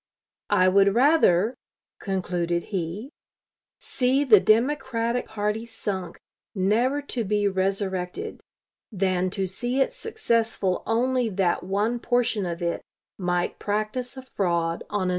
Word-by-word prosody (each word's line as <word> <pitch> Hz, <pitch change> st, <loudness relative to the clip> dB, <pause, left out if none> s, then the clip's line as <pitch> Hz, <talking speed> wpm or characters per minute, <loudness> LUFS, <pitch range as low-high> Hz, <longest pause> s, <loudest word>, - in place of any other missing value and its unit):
I 185 Hz, -, +4 dB
would 195 Hz, +2 st, +4 dB
rather," 240 Hz, -, +4 dB, 0.5 s
concluded 175 Hz, -3 st, -1 dB
he 190 Hz, -, -3 dB, 0.7 s
"see 260 Hz, +2 st, +1 dB
the 225 Hz, -8 st, +7 dB
Democratic 240 Hz, +1 st, +1 dB
party 210 Hz, +1 st, -2 dB
sunk, 195 Hz, -5 st, -4 dB, 0.4 s
never 235 Hz, +9 st, +1 dB
to 250 Hz, -4 st, -3 dB
be 205 Hz, 0 st, +1 dB
resurrected, 190 Hz, -, -2 dB, 0.5 s
than 185 Hz, -2 st, 0 dB
to 195 Hz, +1 st, -2 dB
see 240 Hz, +8 st, -2 dB
it 270 Hz, -, +2 dB
successful 230 Hz, -, -1 dB
only 245 Hz, +2 st, +1 dB
that 185 Hz, -3 st, +1 dB
one 205 Hz, +6 st, -1 dB
portion 235 Hz, -5 st, 0 dB
of 170 Hz, 0 st, -4 dB
it 170 Hz, 0 st, -1 dB, 0.4 s
might 180 Hz, -1 st, -1 dB
practice 215 Hz, +5 st, -2 dB
a 260 Hz, -, -7 dB
fraud 170 Hz, -8 st, -1 dB
on 205 Hz, -1 st, -1 dB
another." 185 Hz, -, 0 dB
210 Hz, 120 wpm, -25 LUFS, 185-245 Hz, 0.7 s, the